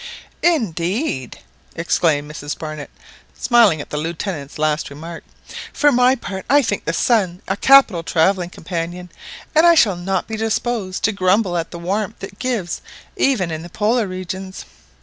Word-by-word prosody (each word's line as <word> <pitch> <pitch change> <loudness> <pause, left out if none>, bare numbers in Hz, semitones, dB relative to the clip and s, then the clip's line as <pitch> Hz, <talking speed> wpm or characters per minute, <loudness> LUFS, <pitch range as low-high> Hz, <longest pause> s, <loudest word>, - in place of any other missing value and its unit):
"Indeed!" 195 - 0 0.4
exclaimed 160 -3 +1
Mrs 145 -1 -5
Barnett, 155 -2 -6 0.5
smiling 225 - +4
at - - -11
the 150 - -2
Lieutenant's 160 -2 -4
last 155 0 0
remark; 165 +4 -9 0.5
"for 290 0 +3
my 250 0 +4
part, 190 -6 -6
I 285 +2 +5
think 205 -4 -2
the - - 0
sun 190 -3 +1
a 190 - 0
capital 245 -6 +5
travelling 175 +2 +1
companion, 175 0 -5 0.4
and 315 - +5
I 340 0 +7
shall 220 - +4
not 185 +2 -2
be 220 - -4
disposed 220 -3 -2
to 220 - +3
grumble 190 -1 +1
at 165 -1 -2
the 170 - -8
warmth 195 +5 -3
it 195 0 -8
gives 235 -9 -2 0.3
even 200 -11 +1
in 160 0 -4
the 175 - -9
Polar 220 +4 +1
regions 185 +1 -6
185 Hz, 155 wpm, -20 LUFS, 165-225 Hz, 0.5 s, I